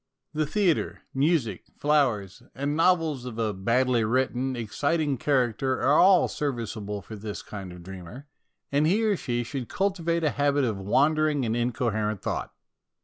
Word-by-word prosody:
The 155 -1 0
theatre, 180 0 0
music, 135 - +1
flowers 125 -10 +1
and 140 +2 -1
novels 165 -6 +2
of 120 -3 -6
a 110 -2 0
badly 115 +5 +1
written, 130 +2 0
exciting 145 +5 -1
character 130 -2 +1
are 145 +3 +4
all 185 -1 +6
serviceable 110 -7 -4
for 110 - -9
this 105 0 -6
kind 95 -3 -8
of 90 0 -11
dreamer, 95 +8 -9 0.5
and 145 +2 +3
he 205 +7 +2
or 215 -2 +3
she 120 -8 -2
should 125 0 -5
cultivate 170 -4 0
a 150 - +2
habit 145 0 +1
of 110 -5 0
wandering 150 +7 +2
and 115 0 0
incoherent 115 -4 -1
thought. - - -3
130 Hz, 150 wpm, -26 LUFS, 110-150 Hz, 0.5 s, all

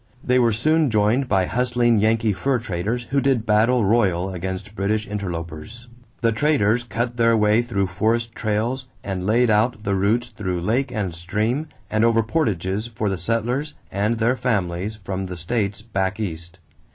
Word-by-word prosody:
They 125 0 +3
were 120 -2 +4
soon 155 +7 +2
joined 110 +5 +2
by 95 -2 +3
hustling 120 0 +2
Yankee 110 0 +2
fur 135 +7 0
traders 110 +2 -3
who 140 0 +2
did 130 -5 +1
battle 110 +2 +3
royal 95 -4 +2
against 95 +3 -5
British 105 +1 -1
interlopers. 100 +3 -6 0.3
The 115 -2 +3
traders 120 -2 +2
cut 120 +2 -3
their 115 -1 +4
way 105 +2 +4
through 115 -5 -1
forest 110 +5 0
trails 115 +5 -2 0.2
and 95 -1 -3
laid 120 +2 +3
out 110 +1 +1
the 100 - 0
routes 110 +5 +1
through 95 -6 -3
lake 125 +8 0
and 105 -7 -2
stream 105 - -1 0.2
and 110 +2 +1
over 115 -1 +4
portages 105 - -1
for 110 -3 -2
the 95 - -1
settlers 120 - -1 0.2
and 105 +4 0
their 115 +3 +2
families 100 -5 -1
from 95 -1 -4
the 90 -1 -6
states 100 +3 -2
"back 95 -3 -2
East." 85 -3 -5
110 Hz, 165 wpm, -22 LUFS, 95-120 Hz, 0.3 s, were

